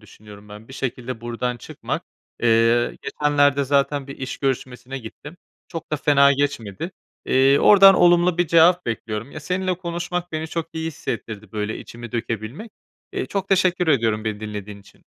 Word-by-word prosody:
düşünüyorum 105 -1 -15
ben. 105 +3 -12
Bir - - -11
şekilde 125 -2 -4
buradan 120 +1 -3
çıkmak. - - -5 0.4
Eee, 115 +1 +3
geçenlerde 145 -1 +2
zaten 140 0 +1
bir 140 - -9
iş 130 0 -5
görüşmesine 130 -1 -3
gittim. 145 +8 -11 0.3
Çok 165 -2 -7
da - - +2
fena 140 -1 +5
geçmedi. 140 - -2 0.4
Eee, 135 +2 +4
oradan 195 -1 +8
olumlu 175 0 +4
bir 175 - +3
cevap 170 +1 +5
bekliyorum. 115 +2 -4
Ya, 155 - -8
seninle 185 +3 -1
konuşmak 175 0 -4
beni 155 0 -3
çok 165 0 -3
iyi 160 0 -4
hissettirdi. 110 -8 -6
Böyle, 105 0 -3
içimi 120 -1 -10
dökebilmek. 115 - -4 0.4
Eee, 385 0 -3
çok 195 -1 -3
teşekkür 180 -3 +2
ediyorum 115 -6 +2
beni 105 -1 -3
dinlediğin 105 -1 -7
için. - - -21
135 Hz, 160 wpm, -22 LUFS, 115-165 Hz, 0.4 s, oradan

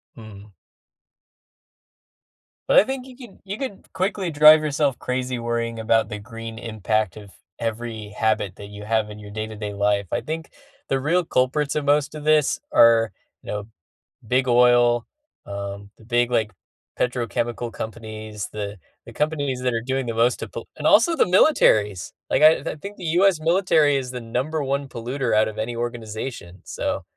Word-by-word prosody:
Mhm. 105 -2 -12 2.2
But - - +7
I - - +6
think 265 +2 -5
you 255 - -12
can 240 -7 -13
you 200 +2 -5
could 255 -7 -7
quickly 190 0 -1
drive 155 0 +8
yourself 145 -3 0
crazy 125 -1 -2
worrying 115 0 -2
about 110 -1 +2
the 105 -2 -5
green 115 +1 -8
impact 110 -3 -1
of 100 -2 -12 0.3
every 115 -2 -4
habit 105 -3 -1
that 100 - -9
you 105 0 -10
have 110 -1 0
in 105 0 -9
your 105 -1 -10
day 110 +1 -4
to 110 - -9
day 105 -1 -5
life. 100 -1 +1
I - - 0
think 160 +1 -5 0.4
the 135 - 0
real 170 +7 +1
culprits 140 +1 0
of 150 -1 -1
most 145 +1 +2
of 150 - -7
this 155 -1 +3
are, 115 - +5 0.3
know, 105 0 -5 0.6
big 130 +3 +2
oil, 120 -1 +4 0.4
um, 100 0 -6
the - - -18
big, 120 +1 +1
like, 110 -3 +1 0.5
petrochemical 120 -1 -2
companies, 110 -2 -6
the 105 -1 -5 0.3
the - - -10
companies 145 -4 -1
that 125 -1 0
are 115 - -1
doing 130 +2 -2
the 115 - -3
most 115 +2 +2
to - - -5
pull - - -8
and - - -6
also 340 -1 +5
the - - +4
militaries, 110 - +3 0.2
like, - - +2
I 155 +1 +8
I - - -4
think 200 +7 -9
the 180 - -8 0.2
US 195 -4 +4
military 160 -3 +3
is 130 -2 -4
the 125 -1 -6
number 130 +7 -2
1 140 +1 -1
polluter 125 +1 -2
out 110 0 +4
of 110 0 -7
any 115 +2 -3
organization, 115 -5 -5
so - - -3
120 Hz, 175 wpm, -23 LUFS, 110-145 Hz, 2.2 s, drive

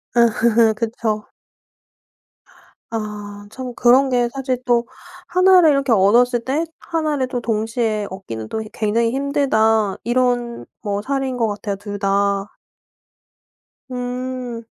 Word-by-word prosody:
아 235 -1 +6 0.5
그쵸. 220 -1 -2 1.6
아 210 -2 -6
참 255 0 -6
그런 255 +3 +4
게 245 -2 +1
사실 265 -2 -2
또 240 -1 +2 0.4
'1 370 +1 +5
를 320 -3 +6
이렇게 275 -2 +1
얻었을 235 +4 +4
때 290 +5 0
1 315 -3 -2
를 260 -1 0
또 250 -1 -3
동시에 220 -1 -1
얻기는 115 - -7
또 220 - -3
이 215 - -8
굉장히 230 +2 0
힘들다.' 225 -7 +1
이런 245 -1 0 0.2
뭐 205 -2 -2
사례인 270 +2 -2
것 230 -2 +1
같아요 205 -1 -3
2 205 0 -7
다. 200 0 +1 1.4
음. 250 -1 -5
235 Hz, 190 characters per minute, -20 LUFS, 210-255 Hz, 1.6 s, 아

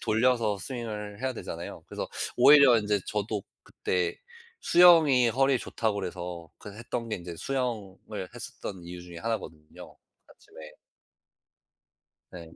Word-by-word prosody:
돌려서 110 -2 +1
스윙을 105 -2 -6
해야 130 0 0
되잖아요. 85 -7 -7
그래서 - - -5 0.3
오히려 140 -1 +8
인제 105 -1 0
저도 105 -1 -2 0.2
그때 90 -2 -2 0.4
수영이 160 -9 +6
허리에 135 +2 +2
좋다 110 -2 -2
그래서 90 -4 -5
그 105 - -10
했던 115 +1 -5
게 110 - -2
이제 85 -1 -8
수영을 105 -6 -4
했었던 95 -3 -7
이유 90 0 -8
중에 85 -1 -10
하나거든요 90 -8 -6 0.3
아침에. 80 -1 -14 1.6
네. 85 -2 -11
105 Hz, 285 characters per minute, -28 LUFS, 90-125 Hz, 1.6 s, 오히려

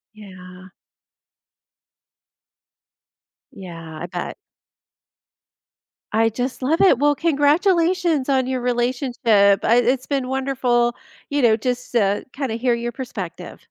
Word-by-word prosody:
Yeah. 185 -2 -13 2.8
Yeah, 165 -4 -10
I 175 - -3
bet. 175 0 -5 1.8
I 225 +1 +2
just 245 +4 -4
love 305 +6 +1
it, 360 -10 +5
well, 290 0 +3
congratulations 330 0 +2
on 260 -2 +1
your 260 -1 -2
relationship, 240 -5 +2
uh, - - -1
it's 250 +2 +2
been 275 -3 -2
wonderful, 255 -3 0 0.3
you 285 0 0
know, 225 -3 +4
just 250 +2 -3
to 205 -3 +1
kinda 265 -5 -3
hear 245 +1 +1
your 235 0 -3
perspective. 255 +1 -7
245 Hz, 110 wpm, -21 LUFS, 220-275 Hz, 2.8 s, it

